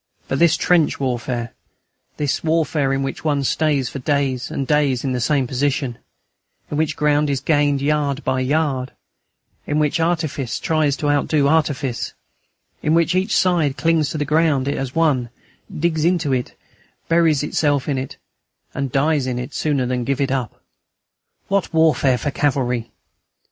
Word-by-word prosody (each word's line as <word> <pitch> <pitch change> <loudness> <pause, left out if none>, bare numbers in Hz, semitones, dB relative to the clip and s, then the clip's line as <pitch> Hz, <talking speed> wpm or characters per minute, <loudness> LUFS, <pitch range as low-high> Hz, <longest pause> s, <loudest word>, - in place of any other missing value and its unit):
But 135 - -1
this 170 -1 +4
trench 175 -4 +2
warfare, 120 -2 -2 0.6
this 145 -2 -1
warfare 155 -3 +1
in 135 0 0
which 135 - -5
one 145 -3 +1
stays 145 -2 +1
for 140 - -6
days 135 -2 -1
and 135 - -3
days 140 -3 +1
in 135 - -1
the 125 -1 -1
same 140 +1 +1
position, 130 -1 -1 0.7
in 145 - -2
which 155 -1 0
ground 150 0 +2
is 140 -2 0
gained 145 -1 +1
yard 145 -1 0
by 130 0 0
yard, 135 -1 0 0.7
in 150 - 0
which 150 +1 +1
artifice 160 -7 -1
tries 155 -3 +1
to 145 -1 0
outdo 145 0 +2
artifice, 140 -5 0 0.7
in 155 +2 +2
which 170 +1 +2
each 190 +3 +1
side 165 -7 +2
clings 160 0 +2
to - - -4
the 145 - -1
ground 150 -3 +2
it 140 - 0
has 135 +1 -4
won, 145 -7 +2 0.4
digs 160 -1 -1
into 165 -5 +1
it, 125 -1 -3 0.5
buries 165 -4 +3
itself 145 -2 0
in 140 -3 0
it, 130 - -6 0.6
and 135 -2 -3
dies 140 0 +1
in 125 -1 -2
it 125 +3 -5
sooner 145 -4 0
than 125 0 -1
give 135 +3 -1
it 135 -2 0
up! 130 -4 -3 0.8
What 195 -1 0
warfare 145 -5 +3
for 140 +4 -2
cavalry! 125 -5 0
145 Hz, 165 wpm, -20 LUFS, 130-155 Hz, 0.8 s, this